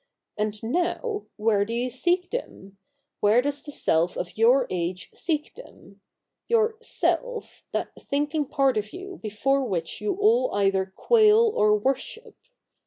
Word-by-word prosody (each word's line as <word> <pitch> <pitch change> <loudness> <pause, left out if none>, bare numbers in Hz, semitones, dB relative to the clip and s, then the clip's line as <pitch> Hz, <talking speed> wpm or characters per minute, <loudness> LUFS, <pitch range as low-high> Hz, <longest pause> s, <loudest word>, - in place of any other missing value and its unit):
And 210 0 -2
now, 355 - -2
where 210 -2 +2
do 225 +3 -5
you 245 +1 -1
seek 355 +8 0
them? 200 - -7 0.4
Where 210 +3 +4
does 285 +2 -1
the 295 - -9
Self 170 - +1
of 175 - -5
your 245 +4 +4
age 180 +1 -3
seek 310 -3 -2
them 200 - -15 0.2
— - - -60
your 450 -1 +3
Self, - - -2
that - - -2
thinking 295 +1 -1
part 270 -4 +1
of 210 0 -3
you 380 +1 -8
before 270 +6 0
which 180 -6 -3
you 210 - -1
all 455 +5 +2
either 195 -1 +2
quail 440 -1 +4
or 210 0 +4
worship 270 - -3
270 Hz, 150 wpm, -25 LUFS, -, 0.4 s, Where